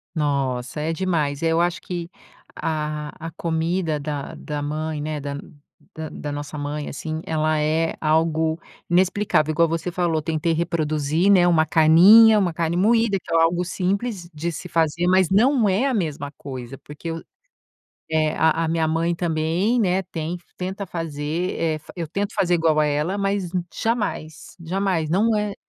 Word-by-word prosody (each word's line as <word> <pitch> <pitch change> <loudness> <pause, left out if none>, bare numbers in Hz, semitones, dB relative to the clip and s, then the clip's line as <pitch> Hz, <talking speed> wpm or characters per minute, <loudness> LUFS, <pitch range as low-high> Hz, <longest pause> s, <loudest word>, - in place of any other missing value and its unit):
Nossa, 140 -3 -1
é 160 +2 -1
demais. 160 -5 -1
Eu 165 0 +2
acho 175 0 0
que 175 -2 -5 0.5
a 150 -1 -3 0.2
a - - -7
comida 165 0 -1
da 145 -1 -5
da 150 -1 -5
mãe, 155 +1 -3
né, 155 0 -3
da 140 0 -5 0.6
da 160 -1 -5
da 145 - -6
nossa 145 +1 -6
mãe, 145 +1 -4
assim, 155 +2 -5
ela 155 -1 0
é 160 +2 0
algo 160 +1 +1 0.3
inexplicável. 180 -3 +2
Igual 165 +2 +3
você 165 +2 -2
falou: 170 -3 0
"Tentei 160 +1 -1
reproduzir, 160 +1 +1
né, 180 -3 +5
uma 165 -2 +4
carninha, 185 +9 +7
uma 180 -4 0
carne 165 +1 -1
moída, 220 +1 +3
que - - -12
é 165 - +4
algo 170 +2 +2
simples 190 +1 -2
de 165 +3 -3
se 175 +2 -7
fazer, 170 +1 +1
mas 185 -1 +4
não 225 +3 +4
é 200 +8 +1
a 270 - 0
mesma 150 - -2
coisa 130 -1 -7
porque 150 +3 -8
eu" 165 0 -5 0.9
eh, 155 -1 +1
a 160 +1 +2
a - - -2
minha 160 0 +1
mãe 165 +2 0
também, 170 +7 0
né, 190 -3 +2
ten 170 -1 -4 0.2
tenta 190 +2 -4
fazer, 165 +1 -3
eh, 160 -2 0 0.2
eu 170 -2 -4
tento 200 +6 -3
fazer 180 -1 +2
igual 160 -2 +2
a 155 - +3
ela, 150 +6 0
mas 195 -2 -1 0.2
jamais, 210 -9 -3
jamais. 175 -2 -1
Não 215 +6 +2
é 210 -1 -1
165 Hz, 165 wpm, -22 LUFS, 155-180 Hz, 0.9 s, carninha